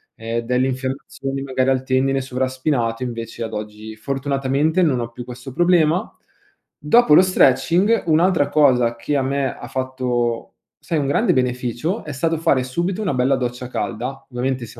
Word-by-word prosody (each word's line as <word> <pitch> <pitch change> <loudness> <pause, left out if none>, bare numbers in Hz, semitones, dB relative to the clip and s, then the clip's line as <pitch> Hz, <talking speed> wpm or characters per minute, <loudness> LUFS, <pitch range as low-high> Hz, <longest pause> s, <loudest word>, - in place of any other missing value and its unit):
ehm, 115 +1 -3
delle 125 +2 0
infiammazioni 135 +1 -4
magari 130 -1 0
al 130 -1 +1
tendine 135 +1 +1
sovraspinato 130 -2 -1
invece 115 -1 -5
ad 110 - -6
oggi, 105 +1 -7
fortunatamente 140 +6 0
non 140 -8 +2
ho 115 0 -4
più 120 +1 -8
questo 125 +1 -9
problema. 175 +2 +2 0.7
Dopo 240 -8 +5
lo - - +8
stretching, 185 - +3
un'altra 165 -1 +3
cosa 125 -6 +3
che 145 +5 -2
a 135 - +2
me 135 0 -1
ha - - -9
fatto, 125 -3 -2 0.2
sai, 165 - -2
un 140 - -1
grande 140 - +2
beneficio, 125 - -1
è 155 - -7
stato 160 +4 -1
fare 135 -5 +2
subito 175 +10 -2
una 195 -8 -1
bella 130 +2 +2
doccia 125 0 -4
calda, 130 +3 -4
ovviamente 125 0 -2
se 120 - -13
130 Hz, 160 wpm, -20 LUFS, 125-145 Hz, 0.7 s, lo